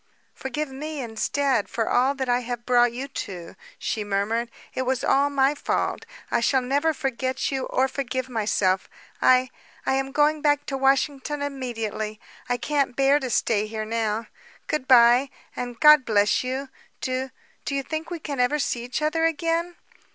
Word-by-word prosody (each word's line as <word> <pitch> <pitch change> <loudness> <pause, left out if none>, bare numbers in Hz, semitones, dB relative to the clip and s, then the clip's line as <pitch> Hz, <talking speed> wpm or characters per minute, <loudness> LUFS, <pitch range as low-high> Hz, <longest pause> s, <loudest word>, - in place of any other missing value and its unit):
"Forgive 275 +3 -4
me 300 +3 -5
instead, 255 +1 0
for 225 -1 -1
all 260 +3 +2
that 265 -1 -3
I 245 0 +2
have 240 -1 -5
brought 245 -1 +4
you 255 +3 -5
to," 185 -10 -7 0.2
she 215 - -2
murmured. 205 +4 -1 0.2
"It - - -2
was 260 0 -1
all 280 +1 +3
my 275 0 +3
fault. 290 - -2 0.2
I - - +2
shall 255 +2 +2
never 285 +5 +1
forget 265 -3 -2
you 265 -1 -2
or 260 +1 +2
forgive 260 -1 -3
myself. 205 -5 0 0.3
I 255 0 +4 0.3
I - - +1
am 270 0 -1
going 300 +1 +2
back 290 -1 +2
to 275 - -3
Washin'ton 275 +2 +1
immediately. 225 -6 -4 0.3
I 245 - +1
can't 280 -1 0
bear 275 +2 +4
to 260 -3 -4
stay 215 -2 +1
here 215 0 -4
now. 225 0 -1 0.4
Good 300 -4 -2
bye, 245 +1 +6 0.3
and 245 -1 -5
God 300 -2 +8
bless 210 -2 +2
you. 260 +2 -3 0.3
Do 260 +1 -2 0.3
do 280 - -3
you 275 - -1
think 315 +3 -4
we 345 -1 -5
shall 285 -3 -3
ever 250 +4 +2
see 245 -4 -1
each 255 +5 -3
other 325 +2 +1
again?" 330 +2 0
260 Hz, 175 wpm, -24 LUFS, 235-285 Hz, 0.4 s, God